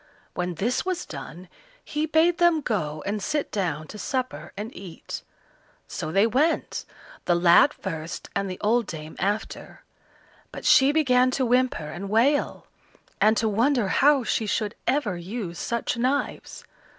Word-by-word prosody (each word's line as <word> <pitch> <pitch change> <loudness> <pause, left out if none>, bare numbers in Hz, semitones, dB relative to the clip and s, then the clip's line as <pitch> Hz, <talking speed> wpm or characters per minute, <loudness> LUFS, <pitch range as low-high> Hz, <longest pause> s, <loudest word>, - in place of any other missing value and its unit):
When 180 -1 -3
this 230 +9 0
was 370 -1 -2
done 165 +5 -9 0.4
he 300 +1 -2
bade 330 +3 +3
them 345 -3 +4
go 155 - -2
and 205 +1 -2
sit 300 +5 -2
down 165 -7 -2
to 210 - -9
supper 255 +1 -3
and 215 +4 -6
eat. 185 -4 -8 0.7
So 155 - -5
they 195 +5 +4
went, 280 +9 0 0.4
the 175 - +3
lad 175 +10 +6
first 165 - -6
and 195 -1 -1
the 185 - -6
old 230 +1 +2
dame 155 -1 -7
after, 205 +3 -3 0.7
but - - -9
she 285 -2 +6
began 255 -5 +3
to 260 - +1
whimper 250 -8 +1
and 195 +3 -6
wail, 250 +7 +1 0.6
and 215 +2 +5
to 225 - +1
wonder 230 +1 +2
how 280 +5 +4
she 220 0 -1
should 210 0 -1
ever 230 -10 +1
use 180 0 -6
such 235 +1 -2
knives. 260 +4 -2
220 Hz, 150 wpm, -25 LUFS, 185-270 Hz, 0.7 s, lad